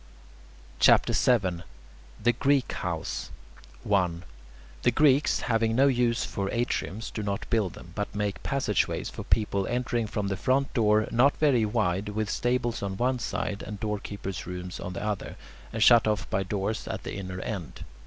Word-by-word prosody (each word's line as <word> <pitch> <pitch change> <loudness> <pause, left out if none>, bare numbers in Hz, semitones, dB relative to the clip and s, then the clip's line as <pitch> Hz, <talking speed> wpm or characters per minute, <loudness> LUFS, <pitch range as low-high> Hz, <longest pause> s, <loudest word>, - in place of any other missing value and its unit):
CHAPTER - - +5
VII 95 -9 +2 0.6
THE 120 +3 +3
GREEK 135 +2 +2
HOUSE - - -3 0.5
1. 90 -4 +1 0.6
The - - +4
Greeks, 140 +3 +3
having 115 -1 +1
no 135 +3 +5
use 120 -3 +2
for 100 -1 -3
atriums, 115 -4 -2
do 110 - -3
not 100 -1 -3
build 105 -6 +1
them, 85 - -12
but 105 +1 -4
make 105 -1 -2
passage 130 -8 +1
ways - - -4
for - - -7
people 100 -3 +1
entering 120 -2 -1
from 105 -2 -2
the 95 - -2
front 135 +5 +1
door, 110 -2 +3
not 130 +5 +4
very 135 -7 +3
wide, 95 0 0
with 110 0 -2
stables 120 -1 0
on 100 -1 -3
one 125 +2 +1
side 105 -2 -3
and 105 -2 -7
doorkeepers' 100 -3 -4
rooms 90 0 -6
on 90 - -5
the 90 - -5
other, 105 -2 -3 0.4
and 110 -1 +1
shut 120 -2 +7
off 105 -1 0
by 95 - +1
doors 100 +2 -2
at - - -4
the - - -5
inner 95 -2 -5
end. 95 -4 -5
105 Hz, 170 wpm, -27 LUFS, 100-120 Hz, 0.6 s, shut